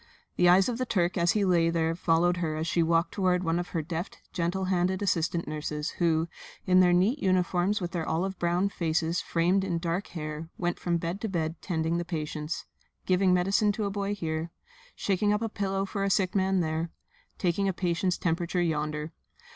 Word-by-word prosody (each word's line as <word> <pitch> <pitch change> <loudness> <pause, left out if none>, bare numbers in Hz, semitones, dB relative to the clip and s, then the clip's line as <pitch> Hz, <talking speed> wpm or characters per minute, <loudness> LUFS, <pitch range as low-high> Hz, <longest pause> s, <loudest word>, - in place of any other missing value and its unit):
The 180 - +4
eyes 185 +2 +6
of 245 -1 -2
the 255 - 0
Turk 175 -5 +1
as 170 -1 +3
he 210 -2 +2
lay 170 -3 +3
there 165 -1 +1
followed 175 +1 +2
her 160 -3 -1
as 155 +1 -2
she 170 +1 +1
walked 165 +1 +2
toward 185 -2 +1
one 165 0 +1
of 175 - -3
her 165 -3 -2
deft, 170 +3 -5 0.2
gentle 180 +1 -1
handed 185 +1 +1
assistant 170 -2 0
nurses 150 0 -3
who, 165 -1 +2 0.4
in 185 0 +5
their 180 -1 +6
neat 195 +11 +3
uniforms 185 0 +1
with 175 -2 -4
their 170 -4 -3
olive 185 +4 -1
brown 175 +3 +1
faces 165 -1 0
framed 180 +3 +1
in 180 -3 -1
dark 170 +3 -2
hair, 155 -1 -6
went 175 -1 -1
from 170 -1 0
bed 170 +4 -4
to 220 - -2
bed 165 -3 -2
tending 165 -1 -1
the - - -1
patients; 155 -2 -4 0.4
giving 185 0 +3
medicine 195 +4 +3
to 215 0 -2
a 200 - -1
boy 200 0 -2
here, 160 -3 -3 0.5
shaking 205 +1 +1
up 210 +2 +1
a 225 - -1
pillow 195 -2 -1
for 200 0 -3
a 195 - +1
sick 185 -1 +1
man 190 -1 +2
there, 160 +1 -1 0.5
taking 190 +2 +1
a - - +2
patient's 175 0 0
temperature 170 +1 -1
yonder. 155 -2 -1
175 Hz, 200 wpm, -28 LUFS, 165-190 Hz, 0.5 s, eyes